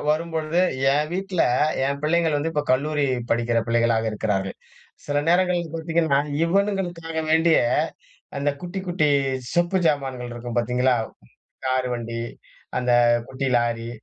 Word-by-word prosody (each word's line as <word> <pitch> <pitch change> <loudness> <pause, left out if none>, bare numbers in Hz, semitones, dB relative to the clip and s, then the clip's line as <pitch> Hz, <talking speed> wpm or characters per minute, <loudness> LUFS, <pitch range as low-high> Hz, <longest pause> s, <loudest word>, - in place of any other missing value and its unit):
வரும்பொழுது, 160 +1 0 0.3
ஏன் 150 +2 +1
வீட்ல 190 -1 0 0.4
ஏன் 140 +1 -1
பிள்ளைங்கள் 160 -1 +2
வந்து 155 +3 -1
இப்ப 150 - 0
கல்லூரி 145 +2 +1 0.2
படிக்கிற 115 0 +1
பிள்ளைகளா 115 -1 +2
இருக்கிறார்கள். 100 -3 -2 0.5
சில 145 0 +1
நேரங்கள்ல 175 -2 +2
பார்த்தீங்கன்னா, 160 -3 +1 0.3
இவனுங்களுக்காக 175 -3 -1
வேண்டியே, 160 -3 +4 0.7
அந்த 145 +1 +1
குட்டி 180 +2 -5
குட்டி 175 -4 +2 0.5
சொப்பு 175 +2 +2
சாமான்கள் 135 -5 -1
இருக்கும் 120 0 -6
பார்த்தீங்களா, 125 +2 +2 0.7
கார் 130 0 +1
வண்டி, 115 -1 -4 0.6
அந்த 125 -1 0 0.4
குட்டி 135 +1 -3
லாரி, 115 -1 -1
150 Hz, 120 wpm, -23 LUFS, 125-170 Hz, 0.7 s, வேண்டியே